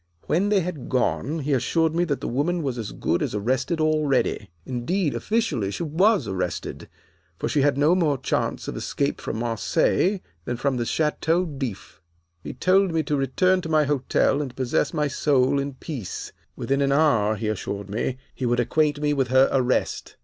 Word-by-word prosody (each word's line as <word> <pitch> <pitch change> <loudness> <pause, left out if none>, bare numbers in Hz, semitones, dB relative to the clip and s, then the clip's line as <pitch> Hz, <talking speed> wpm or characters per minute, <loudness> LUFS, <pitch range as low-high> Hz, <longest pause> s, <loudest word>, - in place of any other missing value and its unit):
When 190 +6 +1
they 205 -2 +3
had 165 -6 -5
gone 140 +4 0
he 145 +1 0
assured 160 +5 +1
me 175 +1 +1
that 145 -5 -2
the - - -3
woman 160 +7 0
was 130 -4 -2
as 110 - -5
good - - -1
as - - -2
arrested 130 +9 0
already. 155 -9 +1 0.2
Indeed, 140 +7 -1
officially, 170 - -1
she 135 - -4
was 175 - +2
arrested; 90 -4 -4 0.5
for - - -2
she 145 - +1
had 140 0 +2
no 150 +4 +4
more 160 -6 +2
chance - - -2
of - - -4
escape - - -2
from - - -4
Marseilles 120 - +1 0.3
than 120 - -3
from 135 +1 0
the 120 - -1
Chateau 160 +3 +1
D'If. 135 - -6 0.4
"He - - -6
told 185 +6 +2
me 160 -1 +1
to 150 - -1
return 185 +8 +2
to 160 - -6
my 155 -1 +4
hotel 140 0 +1
and 130 -4 -5
possess 130 +2 0
my 150 -1 0
soul 140 -1 +2
in 140 -1 -3
peace. 130 - -6 0.2
Within 140 +1 -1
an 140 0 +2
hour 120 -8 +3
he 110 +1 -3
assured 100 -1 -3
me 115 +5 -2 0.2
he 130 - -3
would 120 +1 +1
acquaint 150 +4 +1
me 150 0 +1
with 135 -3 +1
her 130 +2 +4
arrest. 130 -1 0
140 Hz, 185 wpm, -24 LUFS, 125-160 Hz, 0.5 s, no